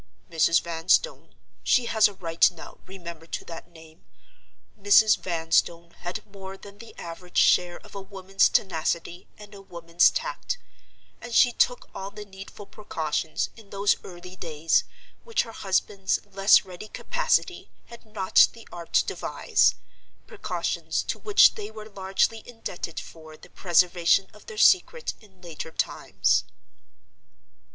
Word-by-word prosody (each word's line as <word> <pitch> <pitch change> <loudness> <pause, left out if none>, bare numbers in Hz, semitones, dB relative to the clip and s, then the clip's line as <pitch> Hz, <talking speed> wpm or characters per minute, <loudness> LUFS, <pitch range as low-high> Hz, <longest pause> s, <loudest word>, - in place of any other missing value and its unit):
Mrs. 165 0 +3
Vanstone—she 185 - 0
has 220 -2 +4
a 205 - -10
right 165 -3 +3
now, - - -13
remember, 170 -4 -10
to - - -5
that 165 0 -10
name—Mrs. 195 +5 0
Vanstone 170 0 0
had 185 +5 -6
more 195 -1 -10
than 200 +1 -14
the 230 - -13
average 175 +1 -8
share 175 -1 +4
of - - -17
a 200 - -6
woman's 195 0 +1
tenacity 170 -1 -1
and 210 -1 -13
a 200 - -11
woman's 170 -2 +2
tact; - - -4 0.6
and 240 -1 -6
she 245 - +6
took 245 +1 0
all 195 +1 -6
the 210 +1 -10
needful 195 +1 -11
precautions, 160 -7 -3
in 220 -3 -16
those 200 0 +2
early 180 0 -11
days, 165 -2 0 0.4
which 460 -2 0
her 225 - -10
husband's 195 -1 -1
less 195 0 +4
ready 185 +3 -10
capacity - - -1 0.2
had 235 - -14
not 210 -4 +4
the 230 -1 -15
art 170 -1 -10
to - - +4
devise—precautions - - -2
to - - -4
which 415 -1 +5
they 420 -1 -7
were 215 - -10
largely 200 +2 -1
indebted 185 -8 -6
for 155 -1 -12
the - - -17
preservation 175 +1 +3
of 210 - -18
their 450 - -9
secret 465 +5 +3
in 190 -4 -22
later 165 -2 -7
times. - - 0
190 Hz, 135 wpm, -25 LUFS, 170-210 Hz, 0.6 s, she